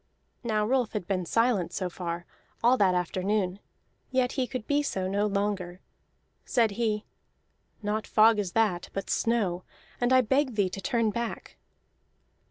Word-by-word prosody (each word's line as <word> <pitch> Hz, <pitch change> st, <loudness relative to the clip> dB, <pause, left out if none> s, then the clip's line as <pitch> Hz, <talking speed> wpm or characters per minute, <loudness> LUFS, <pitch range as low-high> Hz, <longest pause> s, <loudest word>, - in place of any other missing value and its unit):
Now 215 Hz, -3 st, +1 dB
Rolf 250 Hz, -1 st, +1 dB
had 210 Hz, -4 st, -3 dB
been 185 Hz, -2 st, -2 dB
silent 230 Hz, -6 st, +2 dB
so 185 Hz, -, -2 dB
far, 175 Hz, -1 st, -5 dB, 0.4 s
all 245 Hz, +2 st, +6 dB
that 195 Hz, -6 st, +3 dB
afternoon; 185 Hz, +2 st, 0 dB, 0.5 s
yet 255 Hz, -1 st, +1 dB
he 260 Hz, -2 st, -1 dB
could 250 Hz, -4 st, -5 dB
be 290 Hz, 0 st, +2 dB
so 190 Hz, -10 st, -2 dB
no 205 Hz, +2 st, +1 dB
longer. 200 Hz, -3 st, -2 dB, 0.6 s
Said 230 Hz, -4 st, +2 dB
he: 215 Hz, 0 st, -1 dB, 0.8 s
"Not 210 Hz, +1 st, -1 dB
fog 220 Hz, 0 st, +5 dB
is 190 Hz, -4 st, -2 dB
that, 205 Hz, -6 st, +1 dB
but 195 Hz, -, -3 dB
snow, 200 Hz, -6 st, 0 dB, 0.4 s
and 245 Hz, +1 st, +1 dB
I 260 Hz, 0 st, +7 dB
beg 260 Hz, +1 st, +1 dB
thee 200 Hz, -3 st, +2 dB
to 195 Hz, -, -6 dB
turn 230 Hz, +1 st, +1 dB
back." 235 Hz, +2 st, -5 dB
210 Hz, 155 wpm, -28 LUFS, 185-235 Hz, 0.8 s, I